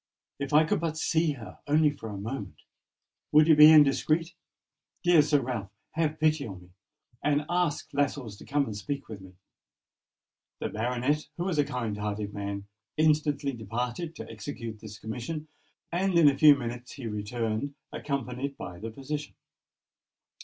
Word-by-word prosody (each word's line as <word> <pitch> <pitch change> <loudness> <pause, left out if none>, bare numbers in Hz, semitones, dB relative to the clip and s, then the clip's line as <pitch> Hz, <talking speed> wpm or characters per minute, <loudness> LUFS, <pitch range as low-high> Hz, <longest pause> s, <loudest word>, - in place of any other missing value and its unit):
If 140 -1 -3
I 150 +2 +6
could 160 - 0
but 160 -1 -2
see 160 -1 +1
her—only 145 +5 0
for 115 -6 -8
a 100 - -6
moment! 105 -1 -6 0.7
Would 155 +1 +6
it 160 - +7
be 150 +1 +10
indiscreet? 155 +2 +4 0.7
Dear 175 -3 +6
Sir 145 -1 +2
Ralph, 120 -6 -4 0.2
have 155 -1 -1
pity 155 -1 +2
upon 95 -5 -8
me, 90 - -19 0.5
and 145 0 +2
ask 175 -4 0
Lascelles 140 -6 -1
to - - -13
come 145 0 +1
and 110 - -5
speak 140 +6 -4
to 110 -2 -8
me." 95 -1 -14 1.2
The - - -2
baronet, 125 +7 -1
who 175 - -1
was 180 -5 -1
a - - +6
kind 125 -7 -3
hearted 105 0 -3
man, 100 -1 -4 0.3
instantly 150 -2 +2
departed 120 - -4
to - - -8
execute 115 0 -7
this 105 -1 -9
commission; 125 +8 -5 0.4
and 180 +1 +1
in 165 -3 +7
a 140 - +5
few 150 0 +8
minutes 120 -1 -6
he 135 -4 -8
returned, 110 +5 -3 0.2
accompanied 135 0 -3
by 90 -1 -7
the 115 - -5
physician. 145 +5 -5
140 Hz, 160 wpm, -28 LUFS, 110-150 Hz, 1.2 s, be